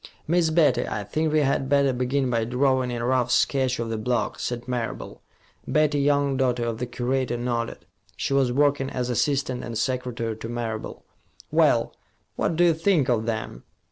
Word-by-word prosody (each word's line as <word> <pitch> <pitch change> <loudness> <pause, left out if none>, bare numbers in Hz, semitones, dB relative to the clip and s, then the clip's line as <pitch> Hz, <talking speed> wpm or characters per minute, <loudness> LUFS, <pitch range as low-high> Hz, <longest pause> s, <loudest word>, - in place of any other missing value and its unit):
"Miss 170 0 +2
Betty, 150 -7 +3
I 105 - -3
think 155 +9 -1
we 155 0 +3
had 135 -1 0
better 140 -1 +3
begin 130 +1 0
by 115 -1 +1
drawing 130 +2 +1
a 120 -1 -3
rough 125 -1 +1
sketch 130 0 +2
of 115 -1 -3
the 110 - -2
block," 120 +2 -1
said 120 0 -4
Marable. 125 -2 -4 0.5
Betty 150 -1 +2
Young, 140 -1 +2
daughter 125 -2 +1
of 115 -1 -3
the 125 - -3
curator, 125 0 -1
nodded. 120 -1 -3 0.3
She - - -1
was 135 -3 +3
working 140 0 +2
as 125 -1 -2
assistant 130 0 0
and 115 -2 -5
secretary 120 -2 -2
to 115 +1 -7
Marable. 115 -2 -5 0.5
"Well - - +3 0.4
what 165 - 0
do 175 - +3
you 170 -1 +5
think 160 -4 +2
of 115 -2 +1
them?" 110 - -4
125 Hz, 175 wpm, -25 LUFS, 120-140 Hz, 0.5 s, you